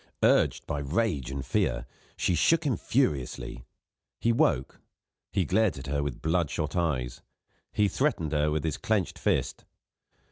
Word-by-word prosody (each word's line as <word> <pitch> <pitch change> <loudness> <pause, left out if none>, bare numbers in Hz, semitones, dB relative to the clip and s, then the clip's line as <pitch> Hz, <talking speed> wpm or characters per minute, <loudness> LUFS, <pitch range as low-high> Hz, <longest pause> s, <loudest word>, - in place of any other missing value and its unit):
Urged - - +3
by 70 - -2
rage 75 - 0
and 65 0 -4
fear, 65 0 0 0.3
she - - +1
shook 160 - +3
him 140 -6 +1
furiously. 65 - -1 0.5
He 115 - +2
woke; 115 - +1 0.5
he - - +1
glared 110 -8 +2
at 65 - -7
her 70 +1 -1
with 70 -3 -4
bloodshot 80 -2 0
eyes; 65 -8 -1 0.5
he 105 - +2
threatened 105 - 0
her 75 0 +2
with 75 0 -1
his 80 -3 -1
clenched 105 -5 -1
fist. - - 0
75 Hz, 145 wpm, -28 LUFS, 70-105 Hz, 0.5 s, Urged